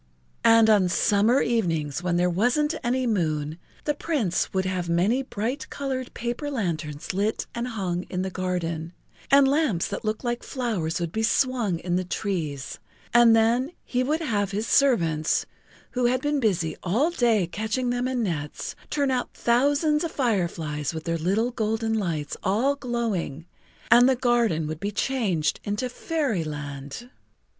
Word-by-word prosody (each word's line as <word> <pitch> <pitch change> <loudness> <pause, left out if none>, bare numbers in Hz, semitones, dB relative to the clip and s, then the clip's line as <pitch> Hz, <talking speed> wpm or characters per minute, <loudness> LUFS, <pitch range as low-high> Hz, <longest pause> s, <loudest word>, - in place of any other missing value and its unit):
And 225 -1 +6
on 205 -4 +4
summer 215 +7 +3
evenings 165 - 0
when 175 -1 0
there 175 - +3
wasn't 245 - +1
any 255 +2 0
moon 160 -7 -1 0.2
the 295 - +1
Prince 275 - -1
would 190 -1 0
have 185 -2 -2
many 190 +10 +2
bright 250 +1 -4
colored 260 -2 -4
paper 240 +5 -3
lanterns 165 - -3
lit 205 +4 0
and 235 +1 -3
hung 185 -6 -3
in 185 0 -2
the 190 - -3
garden, 170 -3 -3 0.4
and 275 0 +6
lamps 275 - +1
that 200 - -4
looked 215 +2 -2
like 240 -1 -1
flowers 215 - -2
would 170 -2 -3
be 220 - -2
swung 230 -5 +1
in 175 +1 -1
the 185 - 0
trees, 165 -8 -3 0.3
and 235 -1 +7
then 240 +7 +2
he 250 - 0
would 300 +6 0
have 205 - 0
his 205 +3 -2
servants, 170 - +2 0.5
who 250 -1 +1
had 255 +1 +2
been 290 +2 0
busy 180 -9 0
all 235 - +1
day 235 - +2
catching 220 +7 -2
them 245 +1 0
in 255 -2 -1
nets, 150 -7 -4
turn 280 -2 +1
out 250 -1 -1
thousands 285 +6 +2
of 335 - -2
fireflies 170 - -1
with 160 - -5
their 165 -1 -1
little 205 +9 +1
golden 225 -1 -1
lights 170 -9 -2
all 235 +9 +1
glowing, 225 - -3 0.5
and 245 +2 +8
the 265 - +3
garden 235 -10 +2
would 155 0 -5
be 200 - -2
changed 205 - 0
into 210 +5 -2
fairyland. 155 - -3
220 Hz, 160 wpm, -25 LUFS, 175-250 Hz, 0.5 s, and